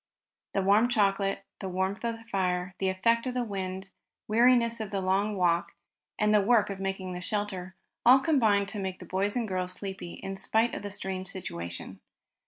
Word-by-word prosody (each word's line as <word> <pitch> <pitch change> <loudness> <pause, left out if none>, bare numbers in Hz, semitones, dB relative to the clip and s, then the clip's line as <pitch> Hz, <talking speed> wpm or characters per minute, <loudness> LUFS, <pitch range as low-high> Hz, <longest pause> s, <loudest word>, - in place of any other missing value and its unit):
The 195 - +2
warm 210 +5 +4
chocolate, 195 -3 +1
the 190 - -4
warmth 190 +3 -2
of 230 -1 -1
the 225 - -14
fire, 185 -4 -1
the 190 - +1
effect 230 +6 +2
of 250 - -3
the 250 - +1
wind, 190 -2 -5 0.4
weariness 235 +1 +4
of 215 -2 -4
the 195 0 -2
long 195 +3 +1
walk, 170 -1 +1 0.4
and 210 0 +3
the 210 - +6
work 210 -1 +3
of 195 - -6
making 190 -1 -3
a 180 - -5
shelter, 190 -2 -3 0.3
all 250 +2 +8
combined 225 -9 +3
to 205 - -3
make 190 -1 -3
the 180 - -10
boys 195 +4 -1
and 240 -3 0
girls 185 -1 -1
sleepy 190 -3 -6
in 195 0 -6
spite 220 +4 +1
of - - -4
their 205 - -5
strange 190 -1 -4
situation. 85 - -5
195 Hz, 190 wpm, -29 LUFS, 185-220 Hz, 0.4 s, all